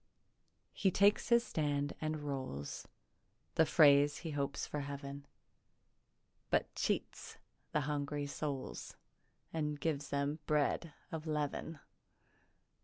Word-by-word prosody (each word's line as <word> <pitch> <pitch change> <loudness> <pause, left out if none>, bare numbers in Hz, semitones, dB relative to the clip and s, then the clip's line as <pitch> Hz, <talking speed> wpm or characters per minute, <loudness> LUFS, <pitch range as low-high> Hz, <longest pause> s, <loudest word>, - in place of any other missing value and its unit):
He 195 - +3
takes 200 +3 +4
his 235 0 +6
stand 145 -2 0
and 155 -1 -2
rolls 130 - -4 0.7
The 160 -2 +4
phrase 145 -1 +6
he 165 - -5
hopes 140 -1 -1
for 150 - -3
Heav'n, 140 0 -6 1.2
But - - +1
cheats - - -2 0.3
the 150 - +2
hungry 145 0 -1
souls 140 -1 -4 0.6
And 150 -2 -1
gives 145 -3 -1
them 140 +2 0
bread 150 +2 +1 0.2
of 160 -1 -4
leav'n. 150 +1 -2
145 Hz, 110 wpm, -35 LUFS, 140-155 Hz, 1.2 s, his